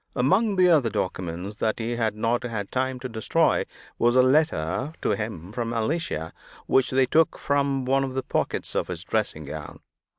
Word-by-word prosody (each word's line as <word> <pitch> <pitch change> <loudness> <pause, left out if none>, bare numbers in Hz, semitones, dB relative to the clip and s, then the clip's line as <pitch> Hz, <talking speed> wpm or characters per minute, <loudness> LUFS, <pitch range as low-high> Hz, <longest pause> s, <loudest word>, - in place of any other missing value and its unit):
Among 190 - +2
the 185 -1 +5
other 150 -9 +4
documents 95 +1 -4
that 110 0 0
he 115 +1 -3
had 110 -3 0
not 115 +2 0
had 110 -5 -4
time 130 0 -1
to 130 - -3
destroy, 110 -3 +1 0.3
was 120 +1 +3
a 130 - +6
letter 130 - +1
to - - +2
him 105 -5 -4
from 115 0 -3
Alicia, 115 - -2 0.3
which 130 -1 +3
they 130 0 +3
took 160 +5 +2
from 140 -2 0
one 135 +1 +2
of 130 -1 -4
the 130 - -1
pockets - - -2
of - - -1
his - - -5
dressing 80 - -2
gown. 75 +1 -8
125 Hz, 185 wpm, -25 LUFS, 110-135 Hz, 0.3 s, a